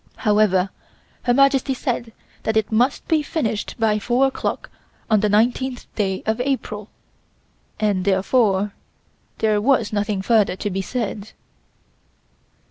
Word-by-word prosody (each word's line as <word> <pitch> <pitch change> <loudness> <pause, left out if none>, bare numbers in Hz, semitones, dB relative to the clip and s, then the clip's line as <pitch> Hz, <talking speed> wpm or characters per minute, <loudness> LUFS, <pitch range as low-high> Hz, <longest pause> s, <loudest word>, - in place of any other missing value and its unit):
However, 205 -4 +2 0.5
Her 245 - +3
Majesty 275 -1 +3
said 240 -3 -3 0.3
that 220 0 0
it 220 -1 0
must 245 +5 +1
be 320 -2 +2
finished 230 -9 -2
by 220 -2 +2
four 245 +5 +2
o'clock 270 - -3 0.4
on 215 - +5
the 210 - +2
19th 245 +4 +1
day 190 -3 -1
of 220 +2 0
April, 225 -6 -3 0.9
and 205 -4 +1
therefore 200 +1 +2 0.6
there 215 -1 +1
was 230 -3 +2
nothing 205 -1 -1
further 215 -4 +3
to 205 +2 -3
be 195 +1 -1
said. 210 -1 -4
220 Hz, 130 wpm, -21 LUFS, 205-250 Hz, 0.9 s, on